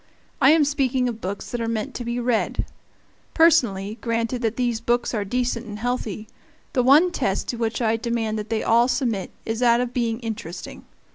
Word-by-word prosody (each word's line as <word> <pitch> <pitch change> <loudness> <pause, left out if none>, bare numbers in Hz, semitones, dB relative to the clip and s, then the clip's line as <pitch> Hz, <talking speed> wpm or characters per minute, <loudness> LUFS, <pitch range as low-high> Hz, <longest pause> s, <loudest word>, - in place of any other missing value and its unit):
I 265 - +7
am 310 -1 +5
speaking 265 -3 +1
of 230 -2 -4
books 195 +2 -5
that 240 - -3
are 230 - -1
meant 230 +4 -2
to 245 - -5
be 235 +1 -2
read. 240 -2 0 0.7
Personally, 230 - +3
granted 230 +1 -1
that 225 -1 0
these 240 -2 -1
books 240 +1 0
are 210 -3 0
decent 245 +2 -2
and 210 -1 -6
healthy, 220 -2 -3 0.5
the 260 - +3
one 295 +8 +5
test 220 - -1
to 240 - -2
which 230 +1 -1
I 225 0 +2
demand 225 -2 -2
that 210 +1 -6
they 225 -1 -1
all 235 +2 +4
submit 235 -7 -1 0.2
is 225 0 -2
that 235 -1 +4
of 245 0 -2
being 230 -2 -1
interesting. 205 -7 -7
235 Hz, 195 wpm, -23 LUFS, 220-250 Hz, 0.7 s, I